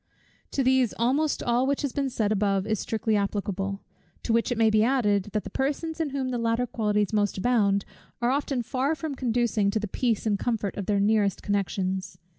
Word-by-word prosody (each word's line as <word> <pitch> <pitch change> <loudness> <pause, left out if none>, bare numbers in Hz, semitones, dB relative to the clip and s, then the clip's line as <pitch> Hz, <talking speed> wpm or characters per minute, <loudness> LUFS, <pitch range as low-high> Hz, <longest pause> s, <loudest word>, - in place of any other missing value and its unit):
To 275 - +1
these 260 -2 +3
almost 275 +6 +1
all 245 +2 +2
which 280 +1 0
has 280 - -1
been 275 -1 -1
said 215 -4 -1
above 200 -2 +1
is 215 -2 -1
strictly 220 0 -1
applicable; 200 -1 -2 0.4
to 225 - 0
which 230 +2 +2
it 245 - 0
may 225 -1 +4
be 215 0 +4
added, 210 -6 +2
that 210 - 0
the - - -8
persons 305 +4 -2
in 320 -3 0
whom 270 -1 -2
the 245 -1 -2
latter 230 +1 +1
qualities 210 -3 0
most 205 -2 +1
abound, 200 -3 +2 0.3
are 240 +1 +1
often 275 -2 -1
far 270 +6 0
from 310 0 -4
conducing 235 -5 +1
to 220 - 0
the 210 - -3
peace 230 +2 -1
and 205 -2 +1
comfort 220 -5 -1
of 200 - -5
their 205 -1 +2
nearest 205 -1 +2
connections. 190 -2 -2
225 Hz, 205 wpm, -26 LUFS, 205-255 Hz, 0.4 s, may